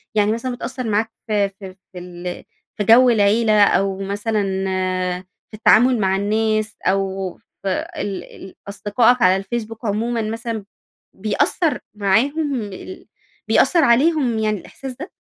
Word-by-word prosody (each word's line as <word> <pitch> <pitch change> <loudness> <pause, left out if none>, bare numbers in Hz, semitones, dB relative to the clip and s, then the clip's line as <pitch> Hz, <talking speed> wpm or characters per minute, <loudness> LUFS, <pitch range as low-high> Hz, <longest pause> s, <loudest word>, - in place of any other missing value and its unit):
يعني 210 0 +3
مثلًا 245 +2 -3
بتأثر 255 0 -5
معاك 220 +2 0 0.2
في 205 -2 +1
في 190 -1 -11 0.2
في 180 - -7
ال 175 0 -7 0.3
في 210 - 0
جو 240 +4 +6
العيلة، 215 -1 +4
أو 195 -1 +2
مثلًا 205 +2 -1 1.1
في 215 - -9
التعامل 240 +3 +5
مع 190 -1 +1
الناس، 215 +1 0
أو 190 -1 -1
في 195 - -8 0.3
ال 195 -2 -4
ال 190 - -13
أصدقائك 225 +5 +2
على 185 -5 +5
الفيسبوك 225 +3 -5
عمومًا 225 +3 -1
مثلًا 225 -1 -4 0.5
بيأثر 255 - 0 0.2
معاهم 275 +10 +1
ال 205 - -9 0.4
بيأثر 335 -3 +4
عليهم 260 -1 +3
يعني 215 -2 0
الإحساس 265 +8 -9
ده؟ 340 +5 -7
215 Hz, 135 wpm, -20 LUFS, 200-235 Hz, 1.1 s, جو